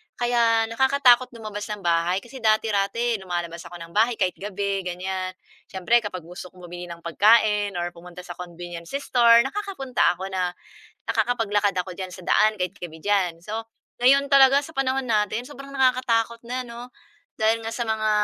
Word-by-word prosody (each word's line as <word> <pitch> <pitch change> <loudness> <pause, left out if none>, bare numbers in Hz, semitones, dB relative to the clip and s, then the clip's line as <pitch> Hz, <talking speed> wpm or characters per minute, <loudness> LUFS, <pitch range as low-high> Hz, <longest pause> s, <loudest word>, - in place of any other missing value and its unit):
Kaya 235 -2 +2
nakakatakot 260 0 +4
lumabas 215 -2 -6
ng 210 -3 -6
bahay, 170 +2 +1
kasi 260 +2 -11
dati-rati 220 +1 +1
lumalabas 175 -2 -4
ako - - -11
ng 170 -1 -10
bahay 225 +5 +2
kahit 185 -3 0
gabi 200 0 -2
ganiyan. 185 +1 -4 0.3
Siyempre 195 +5 +2
kapag 185 -6 -6
gusto 180 +2 -9
kong 180 0 -17
bumili 175 0 -8
ng 170 -1 -10
pagkain 205 +2 +3
or 175 0 -2
pumunta 175 +1 -12
sa 180 - -9
convenience 175 +3 -8
store, 235 -4 +5
nakakapunta 270 - -1
ako 190 +2 -6
na 180 -1 -2 0.5
nakakapaglakad 205 -4 +1
ako 180 0 -3
diyan 185 0 -6
sa 180 0 -10
daan 215 -1 +3
kahit 180 -1 -2
gabi 160 -2 -7
diyan. 185 -3 0
So 220 +2 -3 0.4
ngayon 275 +2 +5
talaga 275 0 +6
sa 305 +3 -6
panahon 270 -1 0
natin, 215 +2 0
sobrang 275 -1 -11
nakakatakot 250 -3 +1
na 250 +1 -4
'no, 240 +1 -9 0.5
dahil 220 +1 +2
nga 225 - -4
sa 235 0 -3
mga 215 -1 0
210 Hz, 170 wpm, -24 LUFS, 180-240 Hz, 0.5 s, talaga